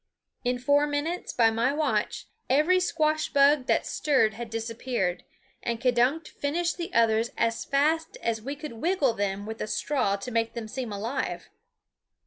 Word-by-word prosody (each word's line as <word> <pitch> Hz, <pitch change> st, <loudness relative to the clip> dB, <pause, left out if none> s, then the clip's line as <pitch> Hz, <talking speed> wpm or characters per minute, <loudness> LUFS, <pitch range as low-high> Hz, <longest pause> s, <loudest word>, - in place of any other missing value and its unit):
In 250 Hz, 0 st, 0 dB
four 285 Hz, +4 st, +3 dB
minutes, 295 Hz, +5 st, -2 dB
by 225 Hz, -2 st, +4 dB
my 230 Hz, +4 st, +1 dB
watch, 300 Hz, +1 st, -1 dB, 0.2 s
every 310 Hz, +8 st, +4 dB
squash 310 Hz, -3 st, +1 dB
bug 280 Hz, -1 st, +4 dB
that -, -, +2 dB
stirred 260 Hz, -8 st, +2 dB
had 230 Hz, +1 st, -7 dB
disappeared, 225 Hz, -4 st, -2 dB, 0.4 s
and 235 Hz, -1 st, -2 dB
K'dunk 255 Hz, +6 st, +2 dB
finished 335 Hz, +4 st, -2 dB
the 345 Hz, +2 st, -5 dB
others 230 Hz, -2 st, +3 dB
as 230 Hz, 0 st, 0 dB
fast 305 Hz, +4 st, +1 dB
as 225 Hz, -1 st, -1 dB
we 275 Hz, +5 st, -4 dB
could 300 Hz, -2 st, -7 dB
wiggle 280 Hz, +1 st, +1 dB
them 200 Hz, -1 st, -2 dB
with 220 Hz, +1 st, -6 dB
a -, -, -2 dB
straw 250 Hz, -4 st, 0 dB
to 200 Hz, +5 st, -6 dB
make 230 Hz, 0 st, 0 dB
them 230 Hz, -2 st, -5 dB
seem 245 Hz, 0 st, -5 dB
alive. 220 Hz, +7 st, -3 dB
250 Hz, 160 wpm, -27 LUFS, 225-295 Hz, 0.4 s, by